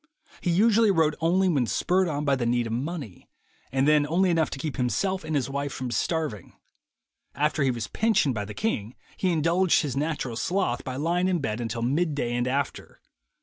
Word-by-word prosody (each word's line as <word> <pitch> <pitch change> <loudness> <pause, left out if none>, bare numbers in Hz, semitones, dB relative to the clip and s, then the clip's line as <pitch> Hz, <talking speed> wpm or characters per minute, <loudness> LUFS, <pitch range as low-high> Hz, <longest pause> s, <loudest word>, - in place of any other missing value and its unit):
He 180 - -1
usually 220 +5 +4
wrote 160 -5 +3
only 180 +4 +3
when 140 -9 +1
spurred 185 +8 +1
on 150 -2 -2
by 140 -1 +3
the 120 -3 -1
need 120 0 +1
of 115 - -3
money, 135 - -5 0.4
and 135 +2 +1
then 150 -1 +4
only 180 +4 +2
enough 165 -2 +2
to - - -6
keep 145 +1 -4
himself 155 - 0
and 155 -1 -3
his 135 -4 0
wife 140 +1 -3
from 130 -2 -5
starving. 145 - -2 0.8
After 150 +1 0
he 135 - +3
was 120 -4 -2
pensioned 215 - +1
by 105 -3 -3
the 105 - -8
king, 120 - -2 0.2
he 185 - 0
indulged 170 +3 +2
his 140 -4 -3
natural 140 -5 -2
sloth 175 -1 -1
by 130 - -5
lying 170 +6 0
in 185 -1 +1
bed 115 -6 -3
until 115 0 -3
mid 150 +5 0
day 120 -4 -1
and 120 +1 0
after. 140 +2 -3
145 Hz, 200 wpm, -26 LUFS, 125-175 Hz, 0.8 s, usually